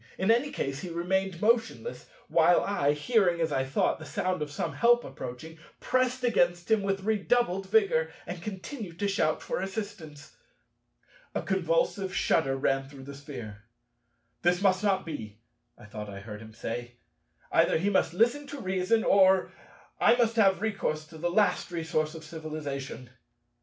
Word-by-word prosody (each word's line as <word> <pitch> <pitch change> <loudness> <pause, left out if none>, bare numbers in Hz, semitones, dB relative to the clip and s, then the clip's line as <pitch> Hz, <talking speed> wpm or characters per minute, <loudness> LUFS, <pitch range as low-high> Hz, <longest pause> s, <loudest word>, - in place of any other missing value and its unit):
In 190 +4 +3
any 240 +5 +2
case 135 0 -3
he 180 - -6
remained 180 +2 -1
motionless, 230 - 0 0.2
while 170 +1 +4
I, 145 -8 +1
hearing, 175 +1 +2
as 165 -2 0
I 135 -2 +1
thought, 135 +4 0
the - - -9
sound 180 +4 -1
of 150 - -2
some 165 +3 -3
help 240 0 +4
approaching, 160 +7 -8 0.2
pressed 255 0 0
against 175 -5 +1
him 220 -2 +4
with 195 -1 -1
redoubled 205 -2 +1
vigor, 190 -7 +3
and 175 -1 -6
continued 195 - -7
to 200 - 0
shout 155 -6 0
for - - -2
assistance. 190 -7 -7 1.0
A - - -1
convulsive 205 - 0
shudder 135 -7 +2
ran 135 0 0
through 140 -2 -11
the 140 +1 -8
Sphere. 125 -7 -9 0.8
"This 175 0 +3
must 190 0 +2
not 195 -2 +1
be," 110 -10 -7 0.4
I - - -14
thought 105 0 -7
I 100 -1 -8
heard 105 0 -8
him 110 -1 -12
say: 120 +2 -5 0.6
"either - - +4
he 195 +5 0
must 175 -3 +1
listen 240 +8 +2
to 285 0 -7
reason, 190 +1 +1
or 190 -1 +4 0.5
I - - +5
must 230 -2 +2
have 195 -4 +4
recourse 195 -8 -1
to 160 -1 -11
the 175 +2 0
last 200 +3 +2
resource 160 -2 -2
of 160 - -9
civilization." 150 -5 -6
175 Hz, 165 wpm, -28 LUFS, 150-205 Hz, 1.0 s, I